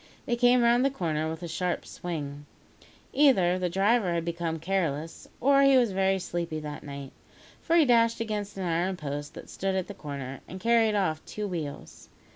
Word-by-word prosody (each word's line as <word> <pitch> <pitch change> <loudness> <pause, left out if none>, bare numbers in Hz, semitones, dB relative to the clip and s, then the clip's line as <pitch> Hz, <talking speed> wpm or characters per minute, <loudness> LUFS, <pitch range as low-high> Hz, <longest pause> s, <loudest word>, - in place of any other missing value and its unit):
They 240 - 0
came 245 0 +4
round 240 +1 +4
the 275 - +3
corner 160 - -2
with 160 +2 -6
a - - -4
sharp 175 +2 -2
swing. 145 -4 -6 0.7
Either 190 -11 +4
the 180 -1 0
driver 195 0 +2
had 165 -1 -1
become 170 -1 -2
careless, 165 -3 -2
or 275 +2 +4
he 275 -1 +6
was 240 -4 +3
very 190 0 +2
sleepy 170 -3 -3
that 150 -1 -6
night, 140 -2 -8 0.5
for 335 - +1
he 330 -3 +6
dashed 230 -2 +3
against 210 -3 -3
an 190 - -3
iron 175 +2 0
post 145 -1 -5
that - - -9
stood 195 0 -2
at 190 -2 -1
the 205 - -8
corner, 140 -6 -6
and 185 - -8
carried 230 0 +3
off 160 -6 0
two 210 -1 -5
wheels. 160 -6 -6
185 Hz, 190 wpm, -28 LUFS, 160-230 Hz, 0.7 s, he